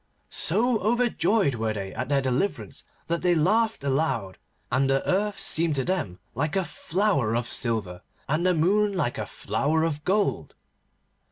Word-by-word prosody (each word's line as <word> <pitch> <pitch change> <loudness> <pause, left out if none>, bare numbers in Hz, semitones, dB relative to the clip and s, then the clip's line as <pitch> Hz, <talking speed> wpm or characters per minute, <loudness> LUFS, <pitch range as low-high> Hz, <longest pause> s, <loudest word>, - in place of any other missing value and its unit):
So 225 +6 +2
overjoyed 220 - +2
were 110 -1 -1
they 95 -2 -5
at 125 +3 -4
their 140 -2 +2
deliverance 135 +10 -2 0.2
that 170 0 -2
they 180 -1 +3
laughed 215 +3 +2
aloud, 135 -9 -1 0.3
and 135 +1 +2
the 135 0 +1
Earth 205 +2 0
seemed 160 -1 +1
to 135 - +1
them 175 - -2 0.2
like 150 - -2
a 190 -2 +1
flower 165 - 0
of 120 0 -1
silver, 110 -9 0 0.3
and 155 +4 0
the 180 -1 +3
Moon 200 +6 +2
like 140 -8 -1
a - - -3
flower 160 +3 -1
of 150 -2 -2
gold. 200 +3 0
160 Hz, 160 wpm, -26 LUFS, 130-195 Hz, 0.3 s, they